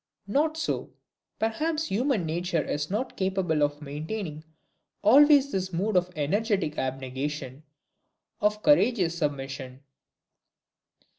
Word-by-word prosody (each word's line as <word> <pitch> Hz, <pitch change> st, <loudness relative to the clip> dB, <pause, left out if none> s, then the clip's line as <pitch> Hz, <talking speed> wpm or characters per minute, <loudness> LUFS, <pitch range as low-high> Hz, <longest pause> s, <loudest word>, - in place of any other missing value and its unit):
Not 305 Hz, +10 st, +1 dB
so. 320 Hz, -, -2 dB, 0.5 s
Perhaps 310 Hz, +8 st, -1 dB
human 230 Hz, -, +1 dB
nature 170 Hz, 0 st, -1 dB
is 145 Hz, +1 st, -3 dB
not 220 Hz, +7 st, -2 dB
capable 190 Hz, -5 st, 0 dB
of 145 Hz, +1 st, 0 dB
maintaining 155 Hz, +2 st, -5 dB, 0.6 s
always 280 Hz, +5 st, +6 dB
this 190 Hz, -1 st, -2 dB
mood 195 Hz, +4 st, -1 dB
of 180 Hz, 0 st, +3 dB
energetic 185 Hz, +1 st, 0 dB
abnegation, 130 Hz, +1 st, -4 dB, 0.8 s
of 210 Hz, 0 st, +1 dB
courageous 215 Hz, -, +3 dB
submission. 135 Hz, -3 st, -4 dB
180 Hz, 100 wpm, -27 LUFS, 150-220 Hz, 0.8 s, always